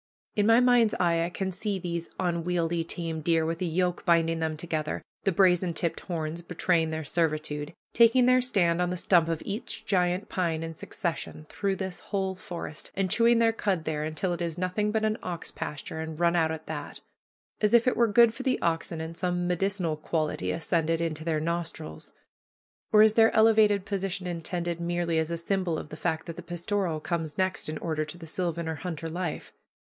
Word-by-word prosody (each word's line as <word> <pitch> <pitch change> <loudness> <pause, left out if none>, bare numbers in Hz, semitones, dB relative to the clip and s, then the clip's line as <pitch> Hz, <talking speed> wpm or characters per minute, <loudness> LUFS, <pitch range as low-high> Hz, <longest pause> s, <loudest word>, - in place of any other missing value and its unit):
In 205 0 +2
my 225 +1 +7
mind's 245 -3 +4
eye 170 -2 +2
I - - -3
can 190 +1 -3
see 200 +2 -2
these 170 -2 -4
unwieldy 170 -1 0
tame 165 -1 -4
deer, 165 0 +2
with 165 +2 -3
a - - +1
yoke 180 +1 0
binding 165 -1 +3
them 160 -1 -1
together, 155 -2 -3 0.2
the 195 - +4
brazen 180 -2 +3
tipped 170 - 0
horns 165 -2 -4
betraying 170 -1 +1
their 160 0 -3
servitude, 155 -1 -1 0.2
taking 235 +2 +6
their 255 0 +5
stand 180 -9 +2
on 180 - +1
the 180 - -2
stump 175 -2 +4
of 165 -1 -2
each 220 +1 -5
giant 180 -1 +1
pine 165 -3 -1
in 165 0 -5
succession 160 -2 -4
throughout 195 -2 -1
this 190 -2 -3
whole 190 -2 -2
forest, 175 -4 -7
and 190 -2 0
chewing 235 0 +5
their 230 -1 +4
cud 195 -6 -1
there, 155 -1 -2
until 155 +4 -1
it 175 - -5
is 170 -1 -2
nothing 185 +4 0
but 220 0 +1
an 215 0 0
ox 175 -2 -5
pasture, 150 +2 -5
and 160 0 -5
run 170 0 +3
out 160 -2 +3
at 160 0 -5
that. 150 -2 -6 0.6
As 210 0 +2
if 235 -1 +6
it 255 - +2
were 235 - +4
good 225 +1 +5
for 250 - -7
the 260 -1 +1
oxen, 165 -1 -1
and 160 +1 -6
some 175 0 -1
medicinal 180 -2 0
quality 155 - -1
ascended 165 - 0
into 160 -2 -2
their 160 -2 0
nostrils. 165 -1 -4 0.8
Or 215 0 +8
is 215 -1 +5
their 225 0 +5
elevated 215 -3 +5
position 195 -2 -2
intended 170 0 -3
merely 170 -1 0
as 160 0 -1
a 170 - -2
symbol 175 -1 -1
of 150 - -7
the 155 - -8
fact 160 0 -1
that 170 -2 -7
the - - -5
pastoral 175 0 -2
comes 160 -3 -3
next 185 -4 0
in 155 - -3
order 155 -1 -2
to 155 +3 -9
the 165 - -10
sylvan 170 0 -2
or 160 - -2
hunter 165 0 -5
life? 170 -1 -4
175 Hz, 200 wpm, -28 LUFS, 160-195 Hz, 0.8 s, Or